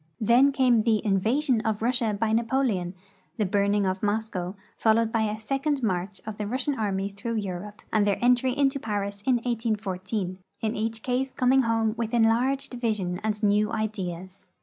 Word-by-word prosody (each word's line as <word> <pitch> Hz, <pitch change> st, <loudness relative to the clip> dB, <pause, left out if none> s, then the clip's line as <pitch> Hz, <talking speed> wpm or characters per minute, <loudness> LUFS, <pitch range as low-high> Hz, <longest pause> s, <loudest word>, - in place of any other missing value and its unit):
Then 240 Hz, +6 st, +5 dB
came 255 Hz, -4 st, +3 dB
the 220 Hz, -1 st, +1 dB
invasion 225 Hz, +6 st, +2 dB
of 220 Hz, -1 st, -2 dB
Russia 240 Hz, -2 st, +1 dB
by 220 Hz, 0 st, +1 dB
Napoleon, 225 Hz, -6 st, 0 dB, 0.4 s
the 215 Hz, -, +1 dB
burning 200 Hz, +1 st, +1 dB
of 190 Hz, 0 st, -1 dB
Moscow, 205 Hz, -3 st, -2 dB, 0.2 s
followed 225 Hz, +1 st, +2 dB
l)y 220 Hz, -2 st, +1 dB
the 215 Hz, -, -5 dB
second 275 Hz, +4 st, -1 dB
march 190 Hz, -1 st, -1 dB
of 215 Hz, -1 st, -6 dB
the 210 Hz, -, -2 dB
Rus 250 Hz, +4 st, -2 dB
sian 290 Hz, -, 0 dB
armies 200 Hz, -2 st, -1 dB
through 230 Hz, +3 st, -4 dB
Europe, 205 Hz, 0 st, -5 dB
and 210 Hz, -1 st, +3 dB
their 200 Hz, -, +2 dB
entry 250 Hz, +2 st, +2 dB
into 275 Hz, 0 st, +2 dB
Paris 200 Hz, -3 st, -3 dB
in 255 Hz, -, +5 dB
1814, 210 Hz, -5 st, -2 dB, 0.2 s
in 220 Hz, 0 st, -1 dB
each 225 Hz, +1 st, -3 dB
case 255 Hz, +1 st, -1 dB
coming 260 Hz, +1 st, +3 dB
home 225 Hz, -2 st, +1 dB
with 230 Hz, 0 st, -1 dB
enlarged 240 Hz, +5 st, +2 dB
vision 210 Hz, -7 st, -1 dB
and 215 Hz, 0 st, -2 dB
new 210 Hz, 0 st, +3 dB
ideas. 190 Hz, -3 st, -4 dB
220 Hz, 170 wpm, -26 LUFS, 200-240 Hz, 0.4 s, Then